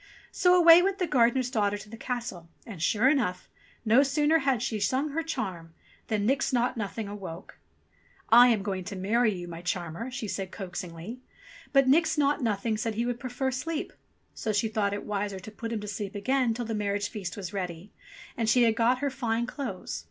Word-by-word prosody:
So 360 -1 +4
away 340 -1 +8
went 390 +1 0
the 365 - 0
gardener's 250 -3 +2
daughter 205 -4 +1
to 205 +1 -11
the 220 - -9
castle, 230 -8 -5 0.2
and 200 -8 -9
sure 215 +8 +3
enough, 245 -11 +1 0.4
no 230 +5 +6
sooner 295 +3 +3
had 265 -5 +1
she 220 -3 -2
sung 260 +8 0
her 310 +3 -2
charm, 175 - -5 0.3
than 210 -2 0
Nix 270 +4 +1
Naught 245 0 +1
Nothing 215 -1 -4
awoke. 195 -4 -8 0.7
"I 240 +2 +9
am 225 -5 +2
going 190 -2 -3
to 200 - -6
marry 215 +5 +2
you, 175 -3 -6
my 170 -1 -8
charmer," 180 +5 -3
she 245 -4 -5
said 195 -1 -4
coax 185 -1 -6
ingly; 180 +7 -8 0.5
but 275 -2 +4
Nix 320 +3 +3
Naught 290 0 +2
Nothing 220 -1 0
said 220 0 -2
he 230 +2 0
would 245 -1 -2
prefer 260 +1 -2
sleep. 310 +5 -3 0.4
So 220 - -2
she 215 +2 +1
thought 210 -2 0
it 205 - -6
wiser 200 -1 -3
to 200 +4 -10
put 225 +2 -6
him 220 -2 -2
to 210 - -7
sleep 205 0 -5
again 245 +3 +1
till 240 0 -3
the 225 - -3
marriage 205 -1 -1
feast 190 -4 -6
was 190 -2 -6
ready, 180 0 -5 0.4
and 225 -2 0
she 245 +1 +5
had 225 -1 +3
got 245 +3 +2
her 280 - 0
fine 235 -3 -1
clothes. 250 -8 -5
225 Hz, 205 wpm, -28 LUFS, 200-255 Hz, 0.7 s, I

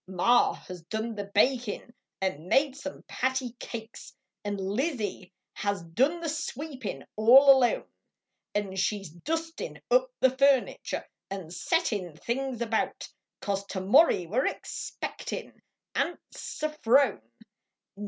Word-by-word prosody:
Ma 190 +7 +4
has 180 -2 -10
done 220 +4 -3
the 205 -2 -4
bakin, 240 0 +1 0.3
nd 185 -6 -1
made 270 - +2
some 285 0 -7
patty 260 -1 -1
cakes, 225 -1 -8 0.3
Xd 205 -1 -2
Lizzie 205 - -2 0.2
has 200 -3 -2
done 265 - +1
the 330 - -2
sweepin 285 - -4
all 260 +6 +8
alone; 245 -2 +2 0.7
An 200 -2 -1
she 200 +2 +1
s 195 - -9
dustin 325 - -4
up - - +5
the 260 0 +4
furniture 275 -1 +2 0.2
Xd 190 -4 -6
settin 210 - 0
things 245 - -3
about, 225 -1 -1 0.3
Cause 200 -1 -1
tomorry 195 - +4
we 210 +10 0
re - - +3
expectin - - -6 0.3
Aunt 345 - 0
Se 310 0 -4
phrone. 260 - +4
235 Hz, 125 wpm, -28 LUFS, 195-275 Hz, 0.7 s, all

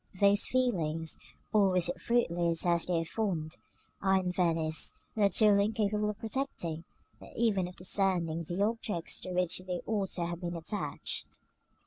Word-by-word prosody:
Those 200 0 +5
feelings, 165 -11 0 0.4
always 190 -4 +4
as 175 -1 -4
fruitless 170 -8 +1
as 170 -1 +2
they 175 -2 +1
are - - -4
fond, 170 -5 -2 0.4
are 190 -1 +4
in 180 -1 -1
Venice 165 -3 0 0.2
not 200 -4 +4
only 200 -1 +6
incapable 210 -1 0
of 210 - -4
protecting, 215 - -3 0.3
but - - -12
even 205 -6 +2
of 180 - -10
discerning, 180 -3 0
the 175 +4 -1
objects 210 -5 -1
to 185 - -6
which 180 -1 +1
they 180 -1 -4
ought 205 -3 -1
to 170 - -1
have 170 +1 -5
been 175 -1 -3
attached. 170 +6 -3
185 Hz, 155 wpm, -31 LUFS, 170-205 Hz, 0.4 s, only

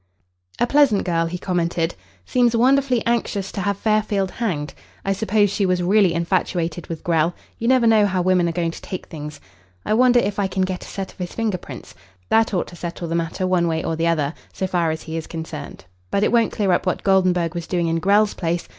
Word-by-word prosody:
"A - - +4
pleasant 265 -6 +3
girl," 165 -2 0
he 175 +2 -4
commented. 170 -2 -1 0.3
"Seems 240 - +2
wonderfully 255 0 +3
anxious 220 -4 -1
to 200 - -4
have 200 +1 -1
Fairfield 210 -3 0
hanged. 155 -11 -3 0.3
I 195 - +2
suppose 205 0 +2
she 200 0 0
was 180 -1 +1
really 190 -2 +3
infatuated 170 -1 -1
with 165 -2 -6
Grell. 165 0 +1 0.2
You 230 - -2
never 255 -1 +4
know 220 -2 +5
how 185 -2 0
women 180 -2 +3
are - - -1
going 170 -1 -1
to - - -10
take 185 - -6
things. 150 -2 -8 0.5
I - - +1
wonder 245 +1 +5
if 205 -2 -1
I 200 - +1
can 190 0 -1
get 185 -1 -3
a - - -10
set 195 -1 -5
of - - -29
his 180 -1 -5
finger 215 -5 -1
prints. - - -10 0.4
That 225 0 +3
ought 185 - 0
to 175 - -12
settle 170 -1 -5
the - - -2
matter 170 +3 -1
one 180 -2 +2
way 160 -1 -1
or 165 - -1
the 165 +1 0
other, 155 -3 +1 0.2
so 190 - -3
far 175 -3 0
as 160 0 -3
he 160 0 -5
is 160 - -5
concerned. 160 - -7 0.2
But 200 - +1
it - - +2
won't 230 -2 +3
clear 200 -3 0
up 175 - +1
what 180 - -1
Goldenburg 185 -3 +2
was 170 -1 -5
doing 175 -2 0
in 165 0 0
Grell's 205 +4 +3
place. 170 -1 -2
185 Hz, 225 wpm, -21 LUFS, 170-210 Hz, 0.5 s, know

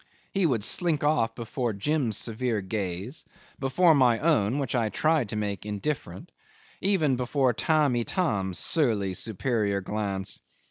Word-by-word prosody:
He 195 -3 +2
would 120 -8 0
slink 165 - +1
off 145 -6 +1
before 120 0 -3
Jim's 120 +1 0
severe 115 0 -1
gaze, 95 - -4 0.4
before 160 +6 +4
my 125 -5 +4
own, 135 -6 +2
which 140 -5 -2
I 115 -4 +1
tried 155 -3 +1
to - - -4
make 105 -2 -3
indifferent, 105 - -4 0.5
even 160 -10 +2
before 125 0 +1
Tamb' 150 0 +2
Itam's 105 - -1
surly, 110 - +2
superior 105 0 -1
glance. 100 -1 -2
120 Hz, 135 wpm, -27 LUFS, 105-150 Hz, 0.5 s, before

